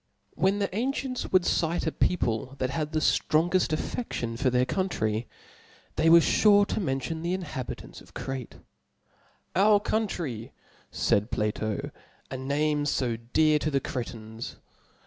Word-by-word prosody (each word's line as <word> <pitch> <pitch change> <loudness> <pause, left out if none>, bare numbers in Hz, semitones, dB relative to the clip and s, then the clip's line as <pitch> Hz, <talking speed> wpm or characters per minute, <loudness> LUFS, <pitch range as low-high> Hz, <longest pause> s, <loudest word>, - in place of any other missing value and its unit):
When 195 +2 +2
the 200 -2 -2
ancients 255 +2 -2
would 185 -1 +5
exprefs 170 -1 +1
a 160 - +1
people 125 -8 0
that 130 -1 -1
had 150 +1 -2
the 155 - +1
ftrongeft 175 +5 +2
afftckion 155 - -3
for 130 - +3
their' 125 0 +2
country, 115 - -1 0.7
they 160 +1 +3
were 170 +1 +9
fure 205 +3 +5
to - - -1
mention 160 -1 -2
the 175 +2 0
inhabitants 150 -9 -6
of - - -18
Crete: 135 -3 -5 1.0
Our 205 +2 +5
Country, 175 - -2 0.4
faid 105 +3 +1
Plato 105 -1 -2 0.4
C) - - -3
^ - - -8
name 145 +2 0
fo 125 -4 0
dear 150 +7 +2
to 155 - -1
thef^^^^"^^ 135 -2 0
Cretans. 115 -2 -6
150 Hz, 145 wpm, -27 LUFS, 125-185 Hz, 1.0 s, were